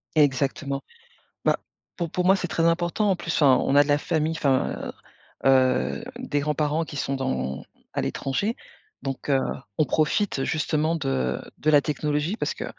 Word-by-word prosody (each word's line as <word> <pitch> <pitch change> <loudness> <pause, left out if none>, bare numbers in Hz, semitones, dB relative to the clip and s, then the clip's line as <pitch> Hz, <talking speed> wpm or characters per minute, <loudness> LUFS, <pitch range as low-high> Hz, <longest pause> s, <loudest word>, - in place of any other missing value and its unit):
Exactement. 140 -1 +1 0.6
Ben, - - +4 0.4
pour 170 -3 -3
pour 180 - -1
moi, 190 +2 +6
c'est 180 -2 -3
très 165 +1 0
important 175 +5 +1
en 185 - +2
plus, 165 -1 -4
enfin, 135 -4 +5
on 135 - +1
a 145 - +8
de 145 - -4
la 145 0 +4
famille, 160 0 0
enfin, 135 -3 0 0.5
heu, 135 - +5
heu, 130 - +3
des 145 - -1
grands-parents 150 +2 0
qui 150 - -9
sont 140 0 -1
dans 65 - -2 0.3
à - - -1
l'étranger, 200 - -1 0.5
donc, 135 +1 -4
heu, 135 - +4 0.4
on 155 - +5
profite 155 +1 +1
justement 155 +1 0
de 65 - -1 0.2
de 155 - +2
la 145 -1 +7
technologie, 150 +6 -1
parce - - -2
que - - -6
150 Hz, 175 wpm, -25 LUFS, 135-165 Hz, 0.6 s, a